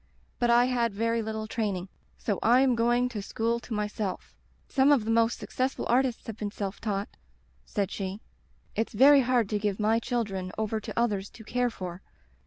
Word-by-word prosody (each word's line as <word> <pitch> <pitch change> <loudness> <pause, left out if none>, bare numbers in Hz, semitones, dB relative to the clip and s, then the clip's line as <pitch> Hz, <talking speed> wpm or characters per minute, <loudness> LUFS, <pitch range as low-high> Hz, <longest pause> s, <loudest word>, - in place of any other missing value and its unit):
But 240 - +2
I 240 +1 +6
had 235 -4 0
very 230 +2 +1
little 220 0 -4
training. 205 -5 -2 0.3
So 205 -4 -2
I 245 +3 +5
am 265 -2 +4
going 240 +1 +2
to 220 -4 -5
school 230 +4 -1
to 235 - -15
myself. 210 -2 -3 0.3
Some 270 +1 +4
of 260 -7 +3
the 225 - 0
most 230 0 +3
success 260 +1 -2
ful - - -4
artists 250 0 +1
have 225 -2 -6
been 210 -2 -3
self 200 -1 -5
taught/ 205 -2 -2 0.6
said 200 -1 -1
she. 195 0 -4 0.6
*It's 225 - -1
very 275 +5 +7
hard 245 -3 +2
to 210 - 0
give 205 -1 -1
my 220 +2 +3
children 205 -6 -2
over 220 0 -1
to 215 0 -4
others 205 -4 0
to 220 - -13
care 245 +2 0
for. 180 -5 -7
225 Hz, 195 wpm, -28 LUFS, 205-240 Hz, 0.6 s, very